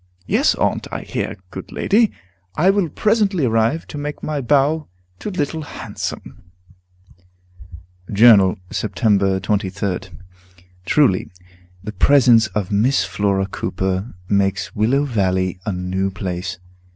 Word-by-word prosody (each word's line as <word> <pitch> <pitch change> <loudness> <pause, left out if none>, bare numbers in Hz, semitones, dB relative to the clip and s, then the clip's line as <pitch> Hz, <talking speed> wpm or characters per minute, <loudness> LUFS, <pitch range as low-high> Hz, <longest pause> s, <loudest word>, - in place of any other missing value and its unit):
"Yes, - - +2
Aunt; - - -1
I - - -4
hear, - - -4
good 95 - -8
lady! 220 +1 +2 0.4
I 185 +5 +4
will 195 -4 0
presently 205 - +1
arrive, 115 +7 +1
to 150 - -6
make 145 0 -5
my 150 -2 -2
bow 145 +4 +2 0.3
to - - -5
Little 160 -4 -2
Handsome." 130 -7 -7 1.7
Journal, 100 -3 +6
Sept. 105 0 +1 0.2
23d. 100 -1 -2 0.8
Truly, 115 - +2 0.5
the 105 - -5
presence 120 0 +5
of 105 -2 -3
Miss 115 +7 +2
Flora 100 -1 0
Cooper 95 +2 -3
makes 95 -2 0
Willow 120 +7 +2
Valley 95 -6 0
a - - +1
new 95 +1 -2
place. 95 -2 -5
105 Hz, 115 wpm, -20 LUFS, 95-145 Hz, 1.7 s, Journal